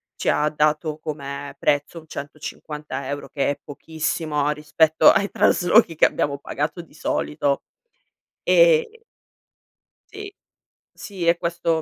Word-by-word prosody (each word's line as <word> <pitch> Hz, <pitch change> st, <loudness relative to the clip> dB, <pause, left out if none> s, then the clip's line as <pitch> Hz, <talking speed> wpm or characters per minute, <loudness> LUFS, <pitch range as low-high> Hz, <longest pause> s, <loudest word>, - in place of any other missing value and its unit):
ci -, -, -1 dB
ha 150 Hz, 0 st, +2 dB
dato, 155 Hz, +1 st, 0 dB
come 140 Hz, -2 st, -6 dB
prezzo, 145 Hz, +3 st, 0 dB
un 160 Hz, -, -10 dB
150 150 Hz, -1 st, -7 dB
euro, 145 Hz, 0 st, -5 dB
che 140 Hz, -1 st, -1 dB
è 145 Hz, -, -3 dB
pochissimo 155 Hz, 0 st, -2 dB
rispetto 155 Hz, +1 st, +4 dB
ai 200 Hz, -2 st, +2 dB
traslochi 180 Hz, -2 st, +3 dB
che -, -, +5 dB
abbiamo 140 Hz, -1 st, 0 dB
pagato 150 Hz, +5 st, -4 dB
di -, -, -22 dB
solito, 75 Hz, -, -1 dB, 0.8 s
e 465 Hz, -2 st, +4 dB, 1.1 s
Sì. 405 Hz, -1 st, -9 dB, 0.6 s
Sì, 185 Hz, -5 st, -5 dB
e 170 Hz, 0 st, +4 dB
questo 170 Hz, -1 st, -1 dB
155 Hz, 120 wpm, -22 LUFS, 145-170 Hz, 1.1 s, che